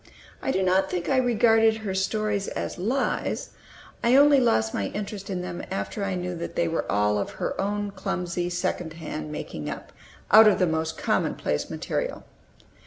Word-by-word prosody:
I - - -2
do 190 -7 +1
not 190 +1 +2
think 175 -1 -2
I 265 - +3
regarded 225 -3 +4
her 210 -3 -4
stories 205 +1 0
as - - -4
lies; 245 +9 -1 0.5
I 235 +2 +5
only 285 0 +7
lost 110 - +2
my 100 - -1
interest 205 - -6
in 180 -2 -2
them 175 -1 -5
after 195 +2 -3
I 195 -1 -1
knew 180 0 -3
that 170 - -6
they 170 - +1
were 165 0 -2
all 105 0 +2
of 100 - -3
her - - -3
own 205 0 -2
clumsy 180 -2 -3
second 175 -2 -2
hand 155 -2 -6
making 75 - -5
up, - - -7 0.4
out 220 +1 +9
of 210 - +5
the 185 - +3
most 160 -1 -1
commonplace - - -1
material. - - -3
190 Hz, 175 wpm, -26 LUFS, 170-215 Hz, 0.5 s, out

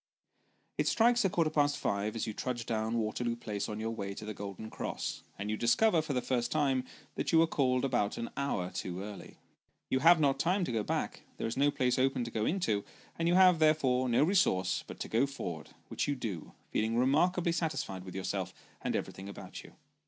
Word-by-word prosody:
It - - +2
strikes 235 +1 +4
a 195 - +3
quarter 165 -3 +1
past 145 -1 +2
five 100 +2 -1
as 115 - -1
you 110 - -4
trudge 120 +1 -3
down 110 0 -1
Waterloo 115 +2 -1
Place 105 -3 -4
on 105 0 -4
your 110 +1 -2
way 100 -3 -4
to 105 - -7
the 110 - -4
Golden 100 +2 -7
Cross, - - -4 0.2
and 105 +2 -3
you - - 0
discover, 165 - +3
for 155 -2 -3
the 125 - 0
first 120 -2 0
time, 145 -4 +2
loo - - 0
Sketches 125 - -18
by - - -16
Boz. - - -33
that - - -1
you 165 - +5
were 165 - +7
called 130 -5 +1
about 120 -6 0
an 115 - -4
hour 120 -10 -1
too 90 +1 -4
early. 105 0 -9 0.5
You 130 - +3
have 165 +3 +7
not 140 -3 +2
time 185 +3 +2
to 170 - -2
go 115 -2 0
back; - - -2 0.2
there - - -3
is 115 - -2
no 145 +1 +3
place 130 -3 +1
open 130 -1 +2
to 120 - -5
go 110 -1 -1
into, 155 - 0 0.4
and 165 - +1
you 175 - +4
have, 185 -3 +6
therefore, 135 -5 +3
no 120 +4 +4
resource 175 - +2
but - - -9
to - - -3
go 120 +5 +2
forward, 85 - -6 0.2
which - - -1
you 145 - 0
do, 105 - -5 0.2
feeling 110 +2 0
remarkably 170 +8 +3
satisfied 160 - -2
with 95 0 -9
yourself, 95 -1 -3 0.3
and - - -1
everything 95 +1 -4
about - - -9
you. - - -15
125 Hz, 225 wpm, -32 LUFS, 105-155 Hz, 0.5 s, were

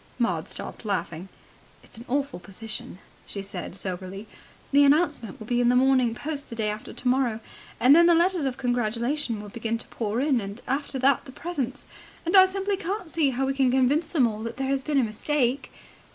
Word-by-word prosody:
Maud 240 -1 0
stopped - - -6
laughing. 185 -3 -3 0.5
"It's - - -12
an 235 - -10
awful 280 -3 -1
position," 205 +1 -7 0.3
she 200 - -5
said 190 -2 -6
soberly. 190 +1 -6 0.5
"The 285 +1 +6
announcement 285 - +2
will 215 - -8
be 245 +2 +1
in 240 - +4
the 250 - +4
Morning 255 -2 +3
Post 290 +1 -5
the 230 - -6
day 215 -2 0
after 210 +1 -7
tomorrow. 250 -3 0 0.4
And 265 +4 +7
then 340 +1 +7
the 345 - +6
letters 345 -2 +2
of 260 -2 -2
congratulation 245 +1 -1
will 205 0 -8
begin 230 +1 -2
to 230 - -9
pour 220 0 -2
in. 270 -3 +2
And 200 +3 -7
after 275 +1 -2
that 265 +1 +2
the 265 - -10
presents. 280 -3 -4 0.4
And 340 - +1
I 375 -1 +10
simply 390 +1 -1
can't 380 -2 -4
see 310 -4 +2
how 265 +1 -1
we 270 - 0
can 270 -2 +2
convince 265 +5 +2
them 285 -8 +3
all 215 -2 -2
that 230 +2 -5
there 270 0 -2
has 275 -1 +1
been 295 +1 -1
a - - +3
mistake." 250 +4 -1
255 Hz, 205 wpm, -26 LUFS, 225-285 Hz, 0.5 s, I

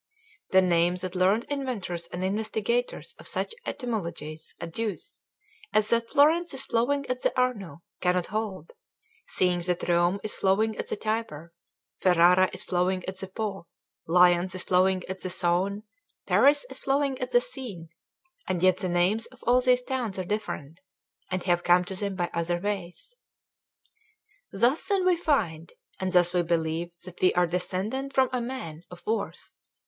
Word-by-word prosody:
The 190 0 +5
name 175 0 +3
that 180 0 -5
learned 190 +5 +3
inventors 225 -13 -4
and 175 +1 -5
investigators 220 +4 -1
of - - -7
such - - -3
etymologies 170 - -5
adduce, 220 - -4 0.5
as 215 0 +3
that 230 0 +1
Florence 315 +3 +3
is 270 - -4
flowing 275 +5 +1
at 255 0 -3
the - - +2
Arno, 200 - -1 0.2
cannot 180 -1 +1
hold; 200 -5 -4 0.5
seeing 180 -1 +1
that 175 0 -2
Rome 175 +2 +3
is 215 - -1
flowing 215 +3 +2
at - - -4
the - - -2
Tiber, 205 -7 -3 0.5
Ferrara 180 +1 +5
is - - -7
flowing 185 +1 0
at 190 0 -5
the 190 - -5
Po, 195 -2 -4 0.4
Lyons 180 +2 +4
is 185 - -4
flowing 185 0 +2
at 185 +1 -6
the 185 - -4
Saone, 185 +3 0 0.4
Paris 290 - +4
is - - -6
flowing 275 -1 0
at 250 - -2
the 245 - +5
Seine, 245 -9 -7 0.6
and 185 -2 -1
yet 185 -1 +5
the 185 - -2
names 180 +6 +1
of - - -19
all 245 +1 +5
these 250 0 +3
towns 245 -7 -3
are 185 - -3
different, 175 -6 -4 0.5
and 185 -1 -2
have 175 -1 +2
come 180 +1 +4
to 190 - -5
them 200 +1 -3
by 175 -2 -2
other 170 +1 -1
ways. 195 - -5 1.4
Thus 240 +9 +2
then 390 -2 +1
we 365 -1 +5
find; 215 - -1 0.3
and 190 0 -1
thus 175 -1 +4
we 180 - +3
believe 165 0 -1 0.2
that 185 -1 -11
we 185 - +4
are 180 0 +4
descended 190 +10 -3
from 260 -1 +4
a 250 - 0
man 235 -11 -6
of 180 - -13
worth. 225 +1 -3
190 Hz, 165 wpm, -27 LUFS, 175-235 Hz, 1.4 s, The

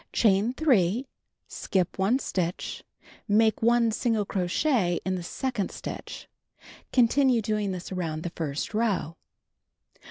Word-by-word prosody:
Chain 210 +2 +3
3, 250 - +2 0.4
skip 185 -1 -2
1 200 +7 +3
stitch, 180 -9 -3 0.4
make 220 +1 +3
1 235 0 +3
single 220 -2 0
crochet 185 - +1
in 185 - 0
the 185 - -3
second 220 +3 -3
stitch. - - -7 0.6
Continue 255 0 +4
doing 210 -2 -1
this 180 0 -6
around 165 -4 -3
the 175 - -4
first 155 +2 -4
row. 205 -8 0
205 Hz, 120 wpm, -27 LUFS, 180-235 Hz, 0.6 s, Continue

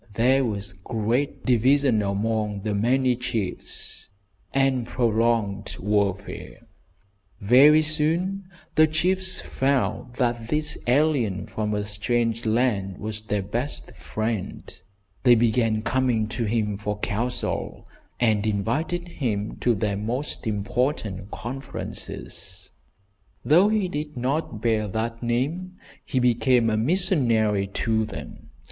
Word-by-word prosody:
There 130 +4 +4
was 100 -5 -2
great 115 +8 -2
division 130 -1 +3
among 105 0 -1
the 105 +1 -2
many 125 +4 +2
chiefs, 115 -6 -4 0.4
and 135 -2 +2
prolonged 115 -4 0
warfare. 100 -1 -2 0.7
Very 140 +9 +6
soon 165 +6 0 0.3
the 155 0 +6
chiefs 185 +4 +1
found 130 -2 -1
that 120 -3 0
this 150 +2 +1
alien 125 -7 +2
from 105 -1 -2
a 105 - -1
strange 115 +2 -1
land 110 -5 +1
was 110 0 -5
their 105 -2 -2
best 120 +9 -4
friend. 110 -3 -4 0.5
They 125 -2 +6
began 115 -1 +2
coming 125 -5 +1
to 115 0 -2
him 105 -2 0
for 105 -1 -3
counsel, 120 +4 -3 0.3
and 110 -3 +2
invited 145 - -1
him 110 -11 -2
to 120 -2 +2
their 100 0 -1
most 120 +5 -3
important 105 -2 -1
conferences. 135 +6 -6 0.7
Though 175 +8 +5
he 215 -3 +1
did 150 -3 -5
not 125 -3 -2
bear 110 -2 +1
that 115 +3 -3
name, 140 +10 -1 0.3
he - - -3
became 120 -1 +3
a - - +1
missionary 115 - +2
to 110 +3 0
them. 110 - -9
115 Hz, 115 wpm, -25 LUFS, 105-135 Hz, 0.7 s, Very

